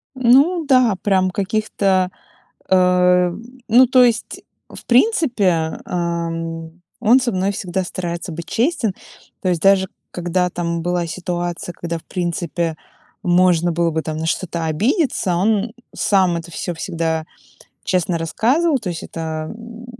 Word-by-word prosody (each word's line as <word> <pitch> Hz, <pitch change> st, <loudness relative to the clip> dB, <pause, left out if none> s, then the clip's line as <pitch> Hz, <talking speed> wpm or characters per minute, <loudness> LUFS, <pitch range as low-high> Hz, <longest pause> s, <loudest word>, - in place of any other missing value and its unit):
Ну 275 Hz, +8 st, +4 dB
да, 255 Hz, -7 st, +4 dB
прям 190 Hz, -2 st, +2 dB
каких-то, 195 Hz, -2 st, 0 dB, 0.6 s
эм, 180 Hz, 0 st, +3 dB, 0.3 s
ну, 250 Hz, +3 st, +7 dB
то 255 Hz, 0 st, +5 dB
есть, 230 Hz, -3 st, -1 dB, 0.3 s
в -, -, -12 dB
принципе, 235 Hz, -, +2 dB
ам, 165 Hz, -1 st, -4 dB, 0.2 s
он 245 Hz, +5 st, +5 dB
со 245 Hz, -1 st, 0 dB
мной 190 Hz, +2 st, 0 dB
всегда 185 Hz, -1 st, -3 dB
старается 170 Hz, -1 st, -5 dB
быть 170 Hz, +1 st, -7 dB
честен. 235 Hz, -, 0 dB, 0.5 s
То 185 Hz, -, 0 dB
есть 170 Hz, -3 st, 0 dB
даже 195 Hz, 0 st, +4 dB, 0.2 s
когда 180 Hz, +1 st, -1 dB
там 170 Hz, -1 st, -3 dB
была 175 Hz, 0 st, -1 dB
ситуация, 175 Hz, 0 st, -4 dB
когда, 170 Hz, 0 st, -4 dB
в -, -, -19 dB
принципе, 170 Hz, -2 st, -2 dB, 0.5 s
можно 175 Hz, -2 st, +3 dB
было 170 Hz, 0 st, +1 dB
бы 160 Hz, 0 st, -2 dB
там 155 Hz, -1 st, -4 dB
на 160 Hz, +1 st, -3 dB
что-то 170 Hz, -1 st, -2 dB
обидеться, 200 Hz, -, 0 dB
он 215 Hz, +3 st, +1 dB, 0.2 s
сам 185 Hz, -4 st, +2 dB
это 170 Hz, +1 st, -7 dB
всё 175 Hz, +1 st, -4 dB
всегда 160 Hz, -2 st, -2 dB, 0.6 s
честно 180 Hz, -2 st, 0 dB
рассказывал. 270 Hz, -, +1 dB
То 210 Hz, -6 st, -6 dB
есть 165 Hz, -, -6 dB
это, 160 Hz, 0 st, -5 dB
м, 230 Hz, +1 st, -11 dB
180 Hz, 140 wpm, -19 LUFS, 170-215 Hz, 0.6 s, ну